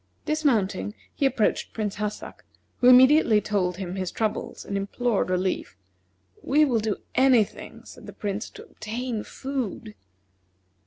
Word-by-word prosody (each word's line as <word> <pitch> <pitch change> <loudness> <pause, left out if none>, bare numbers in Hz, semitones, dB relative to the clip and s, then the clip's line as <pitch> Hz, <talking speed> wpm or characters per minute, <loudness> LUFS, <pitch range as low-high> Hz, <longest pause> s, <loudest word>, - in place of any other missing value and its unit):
Dismounting, 225 -10 0 0.2
he 275 - +2
approached 240 -5 0
Prince 210 -3 -3
Hassak, 210 0 -5 0.3
who 250 - +3
immediately 255 -2 +7
told 190 -4 -1
him 185 -2 -5
his 185 -1 -2
troubles 215 +3 -3
and 200 - -4
implored 200 0 -1
relief. 185 - -2 0.6
"We 300 +3 +3
will 245 -5 +1
do 215 -2 -2 0.2
any 260 -3 +5
thing," - - -11
said - - -13
the - - -9
Prince, 205 +1 -4
"to - - -12
obtain 230 0 -5
food." 255 -5 -5
215 Hz, 140 wpm, -25 LUFS, 200-255 Hz, 0.6 s, immediately